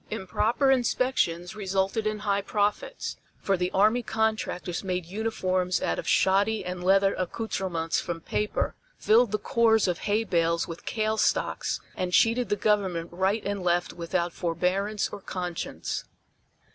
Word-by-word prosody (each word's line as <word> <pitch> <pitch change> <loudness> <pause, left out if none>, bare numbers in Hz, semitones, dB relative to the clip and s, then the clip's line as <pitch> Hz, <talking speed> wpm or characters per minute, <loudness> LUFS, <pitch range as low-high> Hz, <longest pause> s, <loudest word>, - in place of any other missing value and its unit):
Improper 225 +6 +1
inspections 235 -8 +1
resulted 195 +1 -1
in 215 0 -1
high 200 -1 0
profits, 210 - -2 0.2
for 195 - 0
the 180 0 -1
army 215 +6 +3
contractors 220 -6 -1
made 180 -2 -2
uniforms 185 -2 -1
out - - -1
of - - -6
shoddy 200 +2 +2
and 180 0 -4
leather 195 +1 +4
accouterments 180 -4 -2
from 170 -1 -4
paper, 210 +5 -1 0.2
filled 225 0 +4
the 210 - +1
cores 225 0 +3
of 175 -2 -1
hay 210 +2 +1
bales 170 -4 +1
with 165 0 -9
kale 220 0 0
stocks - - 0 0.2
and 180 -1 -2
cheated 230 +1 +3
the 205 - +2
Government 190 -5 0
right 190 +5 0
and 200 -1 -2
left 175 0 +1
without 170 0 -2
forbearance 185 +5 0
or 200 - -8
conscience. 180 -3 -4
195 Hz, 145 wpm, -27 LUFS, 180-215 Hz, 0.2 s, leather